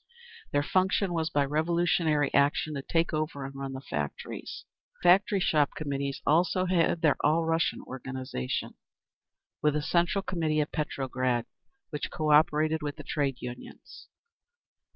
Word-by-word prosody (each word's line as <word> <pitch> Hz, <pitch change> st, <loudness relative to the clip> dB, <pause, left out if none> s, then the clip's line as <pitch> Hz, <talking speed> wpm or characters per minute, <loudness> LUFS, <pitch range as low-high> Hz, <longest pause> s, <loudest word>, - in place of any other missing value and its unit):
Their 145 Hz, 0 st, +2 dB
function 185 Hz, +2 st, +1 dB
was 160 Hz, -1 st, 0 dB
by 145 Hz, -2 st, +2 dB
revolutionary 160 Hz, -1 st, +1 dB
action 145 Hz, +2 st, +2 dB
to 140 Hz, -, -3 dB
take 165 Hz, +4 st, 0 dB
over 155 Hz, -3 st, -2 dB
and 135 Hz, -, -7 dB
run 135 Hz, 0 st, -5 dB
the 130 Hz, -, -6 dB
factories. 75 Hz, -, -5 dB, 0.4 s
The 175 Hz, -, +5 dB
Factory 195 Hz, +3 st, +4 dB
Shop 150 Hz, -5 st, +2 dB
Committees 140 Hz, -2 st, -3 dB
also 180 Hz, +4 st, +3 dB
had 170 Hz, -2 st, +1 dB
their 150 Hz, -3 st, +4 dB
All 160 Hz, +2 st, +3 dB
Russian 165 Hz, 0 st, 0 dB
organisation, 130 Hz, -, -4 dB, 0.9 s
with 150 Hz, -1 st, +2 dB
a 150 Hz, -, 0 dB
Central 175 Hz, +5 st, +1 dB
Committee 160 Hz, -5 st, 0 dB
at 150 Hz, -, -1 dB
Petrograd, 130 Hz, -5 st, -1 dB, 0.5 s
which 150 Hz, -, -3 dB
co 155 Hz, -1 st, -1 dB
operated 155 Hz, +1 st, +4 dB
with 145 Hz, -1 st, -3 dB
the 150 Hz, -, -9 dB
Trade 140 Hz, -3 st, -2 dB
Unions. 125 Hz, 0 st, -9 dB
150 Hz, 145 wpm, -28 LUFS, 140-165 Hz, 0.9 s, The